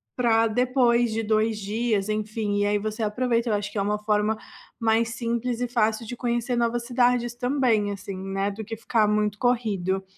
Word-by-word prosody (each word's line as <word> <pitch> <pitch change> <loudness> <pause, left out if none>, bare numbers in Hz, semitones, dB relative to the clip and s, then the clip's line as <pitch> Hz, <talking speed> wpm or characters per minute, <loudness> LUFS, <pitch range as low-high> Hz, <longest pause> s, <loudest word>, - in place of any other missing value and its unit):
pra 230 -2 +3
depois 240 0 +2
de 225 - 0
2 215 0 +1
dias, 215 0 -1
enfim. 215 -1 -1
E - - +2
aí 205 0 +1
você 215 +2 -3
aproveita 235 +2 0
eu - - +1
acho 205 0 -2
que - - -7
é - - +2
uma 210 +1 0
forma 210 0 +1 0.4
mais 225 0 +2
simples 235 +1 -2
e 245 - 0
fácil 225 -2 0
de 245 - -5
conhecer 240 0 -1
novas 235 0 0
cidades 245 -1 +2
também 245 -5 +1
assim, 195 -1 -6
né, 195 +1 -2
do 210 +1 -7
que 225 - -5
ficar 220 -1 +1
muito 210 0 +1
corrido. 200 -7 0
225 Hz, 190 wpm, -25 LUFS, 210-240 Hz, 0.4 s, pra